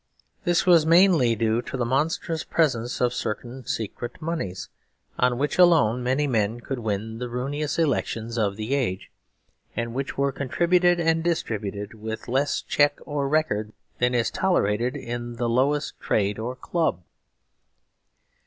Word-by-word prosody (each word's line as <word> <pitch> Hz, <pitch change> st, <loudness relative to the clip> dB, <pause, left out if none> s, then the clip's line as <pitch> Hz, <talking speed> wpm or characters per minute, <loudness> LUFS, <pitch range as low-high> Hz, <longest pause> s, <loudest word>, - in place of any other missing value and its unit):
This 175 Hz, -1 st, +2 dB
was 175 Hz, -3 st, +6 dB
mainly 165 Hz, -7 st, +5 dB
due 115 Hz, +1 st, +1 dB
to 130 Hz, -, -6 dB
the 120 Hz, -, 0 dB
monstrous 155 Hz, +5 st, 0 dB
presence 125 Hz, -7 st, 0 dB
of 125 Hz, -1 st, +2 dB
certain 125 Hz, +3 st, -5 dB
secret 115 Hz, +4 st, -4 dB
moneys, 155 Hz, -, -4 dB, 0.5 s
on 125 Hz, -1 st, +2 dB
which 145 Hz, +6 st, -1 dB
alone 160 Hz, -10 st, +5 dB
many 130 Hz, +4 st, +1 dB
men 115 Hz, -3 st, 0 dB
could 130 Hz, +1 st, -5 dB
win 110 Hz, 0 st, -3 dB
the 125 Hz, -1 st, -4 dB
ruinous 145 Hz, +5 st, -2 dB
elections 115 Hz, -7 st, -1 dB
of 105 Hz, -4 st, 0 dB
the 110 Hz, +5 st, -3 dB
age, 120 Hz, -10 st, -1 dB, 0.6 s
and 115 Hz, -1 st, -3 dB
which 135 Hz, +2 st, -4 dB
were 140 Hz, 0 st, +2 dB
contributed 175 Hz, +6 st, +2 dB
and 165 Hz, -1 st, +2 dB
distributed 105 Hz, -, -2 dB
with 110 Hz, 0 st, -6 dB
less 135 Hz, +4 st, 0 dB
check 145 Hz, 0 st, +2 dB
or 145 Hz, -2 st, -2 dB
record 110 Hz, -9 st, 0 dB, 0.3 s
than 125 Hz, 0 st, +2 dB
is 115 Hz, -1 st, +1 dB
tolerated 120 Hz, -, +1 dB
in 120 Hz, 0 st, -5 dB
the 120 Hz, +1 st, -1 dB
lowest 140 Hz, +5 st, +1 dB
trade 100 Hz, 0 st, 0 dB
or 120 Hz, +3 st, -3 dB
club. 145 Hz, -, -1 dB
125 Hz, 145 wpm, -25 LUFS, 115-150 Hz, 0.6 s, was